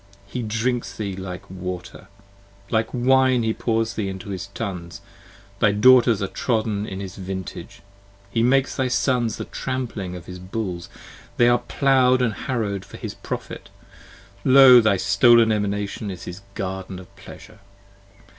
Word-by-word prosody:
He 120 +5 -5
drinks 115 +2 -2
thee 100 -3 -3
up 95 - -8
like 90 -1 -8
water: 90 0 -7 0.6
like 110 0 +1
wine 130 0 +3
he 110 0 0
pours 115 -1 -1
thee 100 -3 -3
Into 95 +1 -7
his 95 -1 -5
tuns: 95 -5 -6 0.6
thy 105 -2 +3
Daughters 120 -1 +5
are - - -1
trodden 110 -2 -1
in 95 - -6
his 95 -2 -7
vintage. 95 -1 -7 0.5
He 115 - +1
makes 135 +3 +2
thy 130 -1 0
Sons 125 -3 0
the - - -5
trampling 115 -8 -4
of 90 - -9
his 90 0 -9
bulls, 90 -2 -5 0.5
they 120 - +5
are 120 0 +4
plow'd 130 0 +2
And 115 -3 +1
harrow'd 105 -6 -3
for 100 - -12
his - - -6
profit, - - -7 0.7
Io! 130 -2 +8
thy 110 -3 +3
stolen 115 +4 +5
Emanation 105 0 -2
15 - - -3
Is 90 - -8
his 90 +3 -8
garden 95 -1 -5
of 90 -1 -14
pleasure! - - -13
110 Hz, 155 wpm, -23 LUFS, 95-120 Hz, 0.7 s, Io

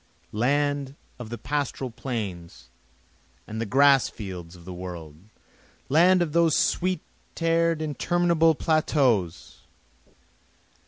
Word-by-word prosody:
Land 140 +4 0 0.2
of 120 -3 -7
the 120 - -5
pastoral 140 -2 -3
plains, 95 - -6 0.8
the 110 +1 -4
grass 140 +2 +5
fields 90 -5 -8
of 85 -1 -15
the 90 - -7
world! 90 -4 -8 0.7
land 175 +5 +5
of 160 - -4
those 170 -2 +3
sweet 180 -2 0 0.4
air'd 165 -1 +1
interminable 165 +1 +2
plateaus! 135 - 0
140 Hz, 100 wpm, -25 LUFS, 100-160 Hz, 0.8 s, grass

